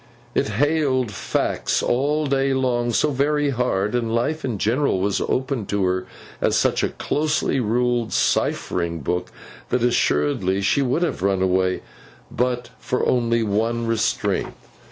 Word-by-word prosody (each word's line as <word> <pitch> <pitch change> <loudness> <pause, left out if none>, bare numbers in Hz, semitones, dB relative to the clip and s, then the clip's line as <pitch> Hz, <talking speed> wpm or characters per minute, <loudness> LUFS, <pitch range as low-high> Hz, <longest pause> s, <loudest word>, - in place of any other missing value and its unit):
It - - +1
hailed 130 0 +1
facts 95 - -1
all 145 +5 +1
day 135 -1 +1
long 120 -2 0
so 150 +6 +2
very 145 +1 +1
hard, 115 -5 0
and 115 -2 0
life 155 +7 -1
in 125 -5 -2
general 115 +1 +1
was 100 +1 0
opened 130 -4 -1
to 100 -1 0
her 90 0 -1 0.3
as - - +2
such - - +2
a - - +1
closely 150 -2 0
ruled 120 0 0
ciphering 85 -2 0
book, 90 +5 -2 0.4
that 125 - +1
assuredly 95 -4 +1
she 100 +8 +2
would 135 +6 +1
have 170 - -2
run 95 -1 +1
away, 95 0 +1 0.5
but 125 0 -1
for 125 - -1
only 115 -2 +2
one 115 +3 0
restraint. 115 -1 0
120 Hz, 145 wpm, -22 LUFS, 100-135 Hz, 0.5 s, so